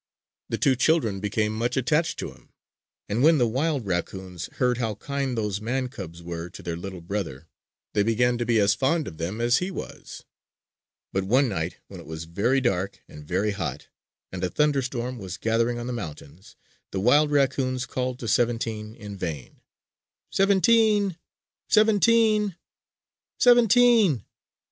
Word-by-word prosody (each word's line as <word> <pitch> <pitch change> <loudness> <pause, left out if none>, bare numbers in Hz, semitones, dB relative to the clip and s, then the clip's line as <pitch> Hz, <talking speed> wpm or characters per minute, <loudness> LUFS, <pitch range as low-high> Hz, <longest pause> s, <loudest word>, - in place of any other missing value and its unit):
The - - -1
two 135 -2 +3
children 125 -8 +2
became 105 +1 -1
much 120 +3 -1
attached 150 +6 +1
to - - -5
him; - - -20 0.6
and 105 +4 -1
when 160 +3 +6
the 125 - +3
wild 135 +2 -1
raccoons 90 -1 -4
heard 125 -1 +1
how 110 -3 -1
kind 135 +2 -3
those 105 -2 -2
man 125 +3 -2
cubs 85 -9 -9
were 85 0 -5
to - - -12
their 85 - -3
little 95 +1 -7
brother, 85 -6 -4 0.5
they 105 - +2
began 120 +3 +2
to 120 - -1
be 115 -2 +3
as 100 0 +4
fond 150 +3 0
of 80 - -9
them 90 +7 -3
as 120 +1 +3
he 180 - -2
was. 190 - -8 0.9
But 95 0 0
one 130 +7 +3
night, 85 -6 -3
when - - -10
it - - -12
was 80 +1 -6
very 100 +11 +1
dark 100 -6 -1
and 75 - -12
very 95 +7 0
hot 100 - -5 0.4
and 90 0 -5
a 90 - +1
thunderstorm 130 -4 0
was 95 -3 -6
gathering 115 +1 0
on 120 - -5
the 125 - -3
mountains, 80 -4 -9 0.3
the 95 - -3
wild 145 +9 +4
raccoons 130 -3 +1
called 125 0 -3
to 115 - -4
"Seventeen" 115 -1 0
in 105 -3 -8
vain. 80 -8 -6 0.7
"Seventeen! 200 0 +3 0.5
Seventeen! 215 -2 +4 0.8
Seventeen!" 235 - +5
120 Hz, 160 wpm, -25 LUFS, 95-140 Hz, 0.9 s, when